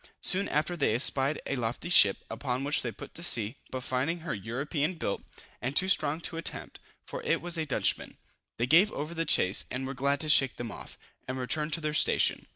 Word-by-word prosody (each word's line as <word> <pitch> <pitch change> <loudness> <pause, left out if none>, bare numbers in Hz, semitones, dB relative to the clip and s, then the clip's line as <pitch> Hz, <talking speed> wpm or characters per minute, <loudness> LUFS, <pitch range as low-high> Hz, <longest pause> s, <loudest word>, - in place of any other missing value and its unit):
Soon 195 +2 +3
after 155 +4 0
they 140 -9 +1
espied 135 +4 +1
a 140 - -2
lofty 120 +6 -3
ship, 105 - +5
upon 125 +2 -3
which 145 +1 +1
they 120 - -2
put - - -11
to - - -9
sea; 120 -6 +3
but 130 - -5
finding 140 +7 -1
her 165 - -3
European 140 - -2
built, 100 - -3 0.4
and 135 +3 -3
too 190 - +2
strong 155 -5 +1
to 165 - -4
attempt, 165 - -3 0.3
for - - -6
it 470 0 +1
was 175 0 -3
a 160 -2 -2
Dutchman, 140 - -1 0.4
they 120 - +1
gave 170 +11 +5
over 150 +3 -4
the 165 0 -2
chase, 95 -8 +2
and 130 +1 -4
were 135 - -4
glad 140 +2 0
to 155 - -3
shake 135 -3 +5
them 120 -2 -6
off, - - -10 0.3
and 130 +1 -3
return 150 +4 0
to 165 +1 0
their 150 -1 -2
station. - - +2
145 Hz, 215 wpm, -29 LUFS, 125-165 Hz, 0.4 s, ship